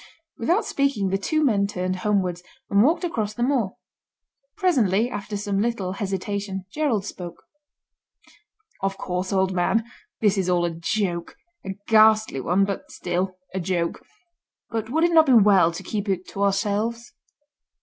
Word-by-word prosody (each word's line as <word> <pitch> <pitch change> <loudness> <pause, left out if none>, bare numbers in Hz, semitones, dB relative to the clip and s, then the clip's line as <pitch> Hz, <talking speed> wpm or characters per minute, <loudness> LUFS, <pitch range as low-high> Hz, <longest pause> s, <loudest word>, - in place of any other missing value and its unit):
Without 345 - +1
speaking 275 -9 0
the 195 - +1
two 310 +9 +1
men 200 -6 +2
turned 185 -1 -2
homewards, 185 -3 0 0.3
and 200 0 +5
walked 320 - +3
across 220 -11 -2
the 240 - -1
moor. 245 -7 0 0.8
Presently, 240 - +2
after 205 +1 -4
some 200 -1 -1
little 215 -5 -1
hesitation, 195 0 -3
Gerald 255 -10 0
spoke. 175 -4 -8 1.4
"Of 195 0 -1
course, 180 +1 -3
old 190 -1 +1
man, 185 +5 +1 0.4
this 205 -2 +2
is 185 -1 0
all 175 -1 +2
a 170 - -1
joke; 170 +1 -2 0.3
a 195 0 -5
ghastly 215 -9 +4
one, 180 +8 +2
but 200 -1 -5
still 185 +1 -3 0.2
a 190 - -2
joke. 170 -1 -2 0.7
But 225 -1 -3
would 320 +6 +1
it 345 - +4
not 320 -2 +6
be 265 - +5
well 195 -6 +6
to 170 +3 -7
keep 205 +2 -3
it 185 -1 -1
to 200 - -6
ourselves?" 210 +4 -1
200 Hz, 155 wpm, -24 LUFS, 185-225 Hz, 1.4 s, not